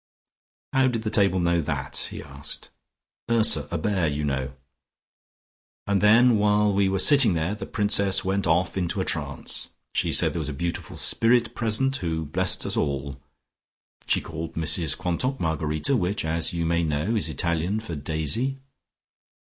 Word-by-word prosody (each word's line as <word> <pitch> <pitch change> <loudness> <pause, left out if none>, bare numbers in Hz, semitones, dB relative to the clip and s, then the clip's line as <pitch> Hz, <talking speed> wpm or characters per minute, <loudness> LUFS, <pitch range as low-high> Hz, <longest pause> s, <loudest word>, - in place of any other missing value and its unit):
"How 135 0 +3
did 115 -3 -2
the 110 - -3
table 95 -4 +2
know 85 -1 +1
that?" 70 -3 -3
he - - -8
asked. 70 0 -7 0.6
"Ursa, 115 -1 +3
a 85 - -2
bear, 90 0 0
you 75 0 -2
know. 70 -2 -2 1.3
And 100 -1 0
then, 115 +2 +5
while 105 0 +2
we 100 0 +2
were 95 - 0
sitting 120 - +5
there, 85 +4 -1
the 105 -1 -7
Princess 100 -3 +2
went 95 0 -1
off 85 +2 +1
into 95 +2 -2
a 95 - -1
trance. 70 -3 -2 0.2
She - - 0
said - - +3
there - - -3
was - - -3
a - - -4
beautiful 85 +5 -5
spirit 120 +1 +2
present, 125 +4 +1
who 80 -3 -3
blessed 75 - +2
us - - -1
all. 70 -2 -3 0.9
She - - +2
called 80 0 -7
Mrs 80 -1 +1
Quantock 125 +10 -2
Margarita, 80 - -1
which, 100 -4 -1
as 80 +1 0
you 85 -1 -2
may 85 +1 +1
know, 80 +7 -1
is 105 - 0
the - - -6
Italian 85 +4 -1
for 110 -6 -7
Daisy." 80 - -2
90 Hz, 165 wpm, -24 LUFS, 80-105 Hz, 1.3 s, then